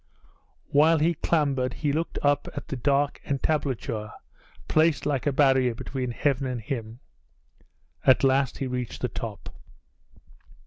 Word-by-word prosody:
While 155 Hz, +3 st, +5 dB
he 160 Hz, +3 st, +2 dB
clambered 140 Hz, -6 st, 0 dB
he 145 Hz, -2 st, -1 dB
looked 165 Hz, +3 st, -2 dB
up 145 Hz, 0 st, +2 dB
at -, -, -7 dB
the -, -, -2 dB
dark 140 Hz, +3 st, +1 dB
entablature 135 Hz, -6 st, -2 dB, 0.6 s
placed 155 Hz, -1 st, +2 dB
like 145 Hz, -2 st, -1 dB
a -, -, +3 dB
barrier 130 Hz, -3 st, +3 dB
between 130 Hz, +1 st, -4 dB
heaven 135 Hz, +2 st, 0 dB
and 125 Hz, -2 st, -3 dB
him. 115 Hz, 0 st, -6 dB, 1.0 s
At 130 Hz, -, +5 dB
last 135 Hz, -1 st, +2 dB
he 135 Hz, -, -3 dB
reached 125 Hz, -2 st, -4 dB
the -, -, 0 dB
top. -, -, -7 dB
135 Hz, 135 wpm, -26 LUFS, 125-145 Hz, 1.0 s, While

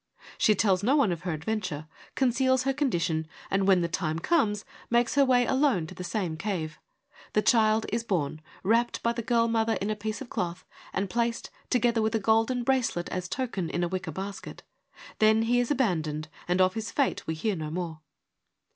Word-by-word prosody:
She 215 Hz, -, +4 dB
tells 190 Hz, -2 st, +2 dB
no 250 Hz, +7 st, +3 dB
one 275 Hz, -10 st, +3 dB
of 170 Hz, -1 st, -3 dB
her 180 Hz, -1 st, -3 dB
adventure, 160 Hz, -2 st, -3 dB, 0.3 s
conceals 260 Hz, 0 st, +2 dB
her 270 Hz, 0 st, +1 dB
condition 170 Hz, -, 0 dB, 0.2 s
and 195 Hz, 0 st, +2 dB
when 185 Hz, -3 st, +5 dB
her -, -, +1 dB
time 165 Hz, -2 st, -2 dB
comes, 210 Hz, -, +1 dB, 0.2 s
makes 235 Hz, 0 st, +2 dB
her 280 Hz, -, +5 dB
way 250 Hz, -2 st, +4 dB
alone 265 Hz, -, +2 dB
to -, -, -9 dB
the 180 Hz, -, -7 dB
same 180 Hz, -4 st, -2 dB
cave. 165 Hz, -4 st, -3 dB, 0.5 s
The 210 Hz, -, +2 dB
child 220 Hz, -1 st, +4 dB
is 230 Hz, 0 st, 0 dB
born, 155 Hz, -8 st, -1 dB, 0.2 s
wrapped 230 Hz, +4 st, +1 dB
by 235 Hz, -, +2 dB
the 235 Hz, -, -3 dB
girl 230 Hz, 0 st, +2 dB
mother 225 Hz, 0 st, +1 dB
in 205 Hz, 0 st, -2 dB
a -, -, -1 dB
piece 215 Hz, +1 st, -4 dB
of 270 Hz, -, -7 dB
cloth, 175 Hz, 0 st, -3 dB, 0.3 s
and 195 Hz, +1 st, -1 dB
placed, 235 Hz, +3 st, -1 dB, 0.2 s
together 240 Hz, -2 st, +2 dB
with 220 Hz, +1 st, 0 dB
a -, -, +2 dB
golden 225 Hz, +4 st, +2 dB
bracelet 240 Hz, -9 st, 0 dB
as 180 Hz, 0 st, -4 dB
token, 195 Hz, -6 st, -2 dB
in 175 Hz, -, -1 dB
a -, -, +1 dB
wicker 185 Hz, -2 st, -4 dB
basket. 195 Hz, +5 st, -7 dB, 0.6 s
Then 220 Hz, +1 st, +5 dB
he 240 Hz, +2 st, +2 dB
is 245 Hz, -, 0 dB
abandoned, 160 Hz, -, 0 dB, 0.2 s
and 180 Hz, +1 st, +2 dB
of 185 Hz, 0 st, +4 dB
his 220 Hz, +1 st, -4 dB
fate 280 Hz, -, 0 dB
we 160 Hz, -, -1 dB
hear 205 Hz, +6 st, -1 dB
no 155 Hz, -3 st, -4 dB
more. 165 Hz, -1 st, -4 dB
215 Hz, 200 wpm, -28 LUFS, 175-235 Hz, 0.6 s, when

